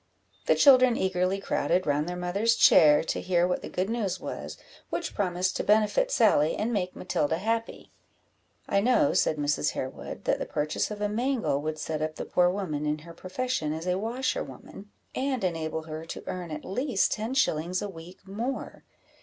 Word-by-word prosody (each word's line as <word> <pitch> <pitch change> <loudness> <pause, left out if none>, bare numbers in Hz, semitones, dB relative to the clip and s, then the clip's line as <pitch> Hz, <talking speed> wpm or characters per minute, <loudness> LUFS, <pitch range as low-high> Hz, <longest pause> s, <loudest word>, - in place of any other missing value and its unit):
The - - +5
children 255 -4 +6
eagerly 185 +1 0
crowded 180 -1 0
round 150 +3 0
their 180 - -4
mother's 195 +6 +1
chair, 150 -8 +6
to - - -2
hear 175 -1 +2
what 180 - -1
the - - -7
good 185 +1 -1
news 210 -5 -2
was, - - -6 0.3
which 340 - -3
promised 185 -2 -1
to - - -2
benefit 215 - +3
Sally, 200 - +3
and 230 +3 -1
make 185 -3 -2
Matilda 160 -3 -1
happy. 225 +4 -3 0.8
"I 200 - +2
know," 255 +7 +3
said 155 - +2
Mrs. 145 0 0
Harewood, 130 - -6
"that - - +1
the - - -4
purchase 150 +1 -1
of 210 -1 -6
a 210 - +1
mangle 230 - 0
would 155 +1 -3
set 155 0 -3
up 155 0 -2
the - - -5
poor 180 0 +3
woman 165 -6 -3
in 150 0 0
her 170 - -10
profession 185 -3 -2
as 160 +2 -5
a 180 +1 0
washerwoman, 230 -2 -4 0.2
and 260 -3 -1
enable 160 -3 -2
her 155 0 -7
to - - -7
earn 180 -2 -5
at 150 -1 -6
least 245 +1 0
ten 225 +4 -2
shillings 175 - +1
a 205 - -3
week 180 +1 -12
more. 230 +7 -5
185 Hz, 185 wpm, -27 LUFS, 160-225 Hz, 0.8 s, children